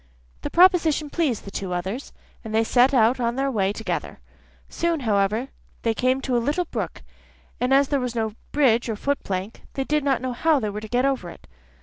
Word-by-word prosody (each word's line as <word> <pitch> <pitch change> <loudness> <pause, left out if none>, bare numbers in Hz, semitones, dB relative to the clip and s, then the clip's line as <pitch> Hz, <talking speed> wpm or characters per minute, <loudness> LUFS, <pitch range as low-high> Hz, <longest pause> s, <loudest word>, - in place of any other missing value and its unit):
The - - -4
proposition 330 -5 +4
pleased 295 -10 -1
the 200 - -8
two 190 -2 -4
others, 190 +9 -4 0.3
and 220 -1 -4
they 225 - +4
set 245 +4 +4
out 245 -1 +3
on 235 -1 0
their 275 +1 0
way 195 -5 +1
together. 220 +2 -4 0.5
Soon, 335 -3 -1
however, 215 +2 +1 0.3
they 230 - +2
came 255 +3 +1
to 260 -2 -1
a - - +4
little 295 +9 0
brook, - - -5 0.6
and 250 +1 0
as 275 0 +4
there 285 - +1
was 250 -2 -3
no 220 -2 -1 0.2
bridge 245 -5 +3
or 220 - -1
foot 280 +6 -2
plank, 190 +3 -4
they 270 - 0
did 300 +1 0
not 270 -3 +2
know 255 0 -3
how 310 +4 +2
they 215 -4 -2
were 210 +1 -5
to 220 - -7
get 245 +4 +1
over 265 -10 -1
it. - - -13
250 Hz, 215 wpm, -24 LUFS, 220-280 Hz, 0.6 s, proposition